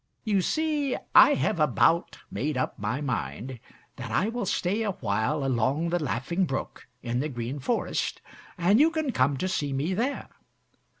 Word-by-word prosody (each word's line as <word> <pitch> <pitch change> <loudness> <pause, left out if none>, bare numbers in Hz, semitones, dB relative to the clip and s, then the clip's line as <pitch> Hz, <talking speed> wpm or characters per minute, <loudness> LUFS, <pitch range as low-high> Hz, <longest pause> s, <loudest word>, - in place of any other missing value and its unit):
"You 205 -4 +2
see 300 - 0 0.2
I 290 +1 +8
have 215 - 0
about 160 +4 +2
made 135 +7 -2
up 130 - -2
my 105 +7 -2
mind 120 - -4 0.4
that - - -6
I 205 - +1
will 230 -4 -3
stay 190 +6 0
a 210 -3 -1
while 125 - -1
along 135 +6 +1
the 175 -1 0
Laughing 150 +8 -1
Brook 135 -5 -5 0.2
in 120 0 -1
the 150 +3 -1
Green 125 +2 -4
Forest, 230 - -1 0.4
and 185 +6 +4
you 310 +3 +6
can 315 -4 -1
come 135 - +2
to 185 - -1
see 145 -6 -1
me 145 +7 -1
there. 245 +9 -2
155 Hz, 170 wpm, -27 LUFS, 130-205 Hz, 0.4 s, I